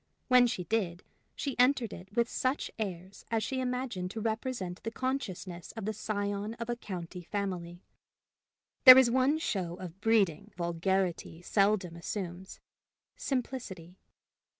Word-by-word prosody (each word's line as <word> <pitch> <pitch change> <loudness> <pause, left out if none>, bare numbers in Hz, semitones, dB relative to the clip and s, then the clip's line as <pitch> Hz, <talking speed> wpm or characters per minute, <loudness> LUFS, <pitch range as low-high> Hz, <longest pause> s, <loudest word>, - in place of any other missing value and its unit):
When 250 -1 +7
she 185 -6 -2
did, 180 -3 -1 0.3
she 275 -3 -3
entered 250 -3 +3
it 190 +4 -11
with 235 -1 +3
such 260 +4 -1
airs 190 -2 -5
as 225 -2 0
she 265 - -2
imagined 250 -7 -2
to 220 - -5
represent 220 -4 -3
the 225 - -3
consciousness 205 -9 -4
of 225 -3 -6
the 215 - -1
scion 205 0 -3
of 235 0 -4
a - - -1
county 180 -5 -7
family: 180 -2 -4 1.0
there 255 -1 +13
is 255 -3 +6
one 260 +4 +3
show 185 - -2
of 185 +1 -9
breeding 205 -8 +2
vulgarity 175 0 -1
seldom 195 -3 +2
assumes 180 +1 -6 0.6
simplicity. 245 - -4
205 Hz, 135 wpm, -31 LUFS, 180-240 Hz, 1.0 s, there